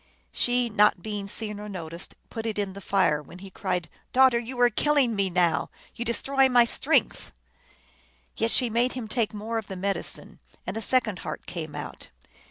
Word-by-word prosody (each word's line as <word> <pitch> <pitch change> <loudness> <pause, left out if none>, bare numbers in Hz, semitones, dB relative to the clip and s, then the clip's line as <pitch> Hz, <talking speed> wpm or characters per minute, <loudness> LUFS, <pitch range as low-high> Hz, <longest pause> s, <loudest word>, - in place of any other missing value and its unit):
She, 245 0 +2
not 210 -4 +3
being 205 -2 -4
seen 210 0 -5
or 210 0 -7
noticed, 170 -2 -7 0.2
put 225 0 -4
it 220 - -3
in 200 -2 -2
the 200 - -9
fire, 185 -7 +2
when 170 +4 -13
he 190 +1 -10
cried, 180 -3 -2
" - - -40
Daughter, 260 -2 +6
you 245 +2 -6
are 245 0 +6
killing 275 -1 +3
me 200 -1 +1
now; 175 -2 +2 0.2
you 235 - -4
destroy 270 +3 +2
my 245 -2 +6
strength." - - +1 1.0
Yet 225 - 0
she 250 +1 +3
made 235 +3 +1
him 250 -4 -5
take 225 -1 0
more 220 +2 -3
of 215 - -9
the 190 - -6
medicine, 195 +2 -3 0.3
and - - -4
a 225 - -3
second 225 -5 +1
heart - - -6
came 160 -4 -6
out. - - -7
215 Hz, 190 wpm, -27 LUFS, 190-240 Hz, 1.0 s, Daughter